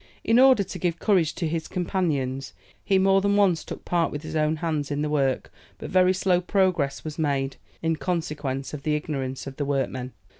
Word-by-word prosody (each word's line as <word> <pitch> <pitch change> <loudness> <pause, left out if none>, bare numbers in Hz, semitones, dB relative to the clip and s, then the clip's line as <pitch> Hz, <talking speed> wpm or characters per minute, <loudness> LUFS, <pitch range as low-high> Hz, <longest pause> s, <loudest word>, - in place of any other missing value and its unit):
In 230 +2 +4
order 260 -5 +6
to 185 - -7
give 170 -2 0
courage 175 -6 +2
to 170 - -2
his 160 0 -3
companions, 150 -8 -2 0.3
he 195 - +3
more 195 0 +4
than 200 +1 +2
once 190 -5 +3
took - - -8
part 170 -2 +1
with 145 +1 -5
his 155 - -6
own 155 0 +2
hands 155 -3 -2
in 145 0 -1
the 150 - -2
work; 135 -3 0 0.2
but - - -7
very 185 0 +5
slow 185 -1 +2
progress 180 -8 +1
was 155 0 -6
made, 140 -3 0 0.3
in 165 -1 +1
consequence 150 -7 -3
of 150 - -5
the 150 +1 0
ignorance 135 -4 -3
of 135 -1 -8
the 145 - -1
workmen. 130 -2 -2
155 Hz, 200 wpm, -25 LUFS, 140-185 Hz, 0.3 s, order